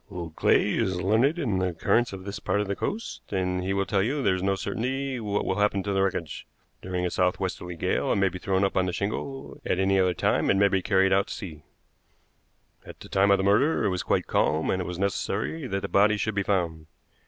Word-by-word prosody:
Old 85 Hz, -5 st, -7 dB
Clay -, -, +3 dB
is 95 Hz, -1 st, 0 dB
learned 110 Hz, -, +2 dB
in 115 Hz, -, 0 dB
the 95 Hz, -1 st, -1 dB
currents 120 Hz, +8 st, +1 dB
of 95 Hz, -1 st, -8 dB
this 100 Hz, 0 st, -5 dB
part 100 Hz, +1 st, 0 dB
of 105 Hz, -, 0 dB
the 100 Hz, -, -2 dB
coast, 225 Hz, -, -4 dB
and 90 Hz, -2 st, -1 dB
he 95 Hz, -, -2 dB
will 100 Hz, 0 st, 0 dB
tell 100 Hz, -1 st, +1 dB
you 135 Hz, +7 st, -1 dB
there 95 Hz, -, +3 dB
is 95 Hz, -, -2 dB
no 95 Hz, +1 st, +1 dB
certainty 130 Hz, +6 st, -3 dB
what 105 Hz, -2 st, -2 dB
will 95 Hz, +2 st, -1 dB
happen 105 Hz, -2 st, +1 dB
to 100 Hz, 0 st, -2 dB
wreckage. 95 Hz, -5 st, -2 dB, 0.3 s
During 90 Hz, -1 st, -3 dB
a 90 Hz, -, -1 dB
southwesterly 90 Hz, -1 st, -1 dB
gale -, -, 0 dB
it -, -, +2 dB
may 100 Hz, 0 st, +3 dB
be 90 Hz, 0 st, -8 dB
thrown 95 Hz, +1 st, 0 dB
up 100 Hz, -, 0 dB
on 95 Hz, 0 st, +2 dB
the 90 Hz, -, -2 dB
shingle; 110 Hz, +8 st, -4 dB
at -, -, 0 dB
any 95 Hz, 0 st, +2 dB
other 90 Hz, -1 st, +2 dB
time -, -, +1 dB
it 95 Hz, -, +3 dB
may 100 Hz, 0 st, +4 dB
be 95 Hz, -1 st, +1 dB
carried 95 Hz, 0 st, +3 dB
out 100 Hz, +1 st, +2 dB
to -, -, -5 dB
sea. 80 Hz, -8 st, -9 dB, 1.2 s
"At -, -, -12 dB
the -, -, -11 dB
time 100 Hz, +1 st, +3 dB
of 100 Hz, -, +5 dB
the 95 Hz, -, -1 dB
murder 110 Hz, +7 st, +3 dB
it -, -, +3 dB
was 90 Hz, -2 st, -1 dB
quite -, -, 0 dB
calm, 80 Hz, +1 st, +1 dB
and 95 Hz, -, 0 dB
it -, -, -4 dB
was 90 Hz, -, -5 dB
necessary 100 Hz, -, -2 dB
that 100 Hz, -4 st, -2 dB
the 100 Hz, -, -3 dB
body 105 Hz, +3 st, +3 dB
should 110 Hz, +1 st, -1 dB
be 100 Hz, -, 0 dB
found. 85 Hz, -6 st, -1 dB
95 Hz, 245 wpm, -26 LUFS, 90-105 Hz, 1.2 s, of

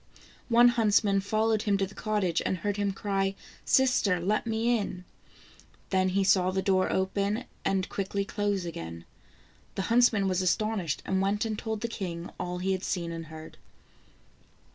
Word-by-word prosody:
One 240 Hz, +1 st, +7 dB
huntsman 210 Hz, -4 st, +3 dB
followed 215 Hz, +2 st, +1 dB
him 205 Hz, -2 st, +1 dB
to 195 Hz, -, +1 dB
the 195 Hz, -, -12 dB
cottage, 205 Hz, -7 st, 0 dB
and 185 Hz, -, -1 dB
heard 205 Hz, +3 st, -2 dB
him 200 Hz, -1 st, 0 dB
cry: 195 Hz, 0 st, -1 dB, 0.2 s
" -, -, -24 dB
Sister, 250 Hz, -8 st, +2 dB
let 210 Hz, +6 st, 0 dB
me 225 Hz, +2 st, +1 dB
in." 185 Hz, -3 st, -5 dB, 0.9 s
Then 185 Hz, -1 st, +2 dB
he 195 Hz, +1 st, +1 dB
saw 185 Hz, -1 st, +4 dB
the 190 Hz, 0 st, -1 dB
door 190 Hz, -1 st, +2 dB
open, 200 Hz, +4 st, 0 dB, 0.2 s
and 190 Hz, -1 st, 0 dB
quickly 200 Hz, 0 st, -2 dB
close 205 Hz, -3 st, -1 dB
again. 85 Hz, -, -7 dB, 0.7 s
The 195 Hz, -, -1 dB
huntsman 230 Hz, -5 st, +4 dB
was 185 Hz, -1 st, +1 dB
astonished, 185 Hz, -3 st, 0 dB
and 190 Hz, 0 st, 0 dB
went 200 Hz, +3 st, 0 dB
and 220 Hz, -1 st, -2 dB
told 220 Hz, 0 st, -4 dB
the 235 Hz, -, -1 dB
king 175 Hz, -6 st, -5 dB
all 180 Hz, 0 st, -3 dB
he 185 Hz, +2 st, -1 dB
had 190 Hz, 0 st, -2 dB
seen 170 Hz, -2 st, -2 dB
and 165 Hz, -1 st, -6 dB
heard. 155 Hz, 0 st, -11 dB
195 Hz, 170 wpm, -28 LUFS, 185-215 Hz, 0.9 s, One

